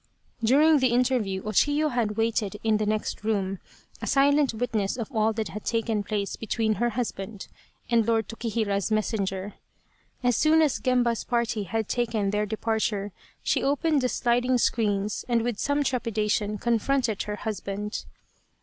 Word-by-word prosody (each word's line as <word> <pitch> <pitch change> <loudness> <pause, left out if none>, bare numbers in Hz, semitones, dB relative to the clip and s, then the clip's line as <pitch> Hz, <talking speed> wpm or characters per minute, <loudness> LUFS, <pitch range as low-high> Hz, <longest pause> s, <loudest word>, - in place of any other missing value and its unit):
During 295 +6 +5
the 260 - +3
interview 240 -6 +1
O 215 - -4
Chiyo 290 +7 +2
had 225 -4 -1
waited 225 -2 0
in 220 -1 +3
the 215 0 -1
next 215 0 -2
room, 195 -3 -1 0.4
a - - -4
silent 285 0 +4
witness 220 -2 -1
of 235 +2 -5
all 220 0 +3
that 215 -4 -3
had 210 +5 -7
taken 225 -2 0
place 205 -1 -2
between 225 0 0
her 240 - +3
husband 210 -4 -4 0.4
and 230 -2 +2
Lord 225 -3 +1
Tokihira's 220 -4 -1
messenger. 205 -2 -1 0.7
As 245 -1 +3
soon 315 +1 +4
as 295 -4 +1
Gemba's 245 -2 +1
party 235 -4 -1
had 220 +3 -2
taken 225 -5 0
their 210 0 0
departure 215 -2 -1 0.3
she - - +1
opened 290 +1 +1
the 250 - +1
sliding 245 +1 +2
screens 210 -4 0
and 235 -1 +2
with 235 -3 -2
some 285 0 +1
trepida 230 -5 -1
tion 210 0 0
confronted 235 0 0
her 210 - -3
husband. 210 0 -4
225 Hz, 160 wpm, -26 LUFS, 210-245 Hz, 0.7 s, During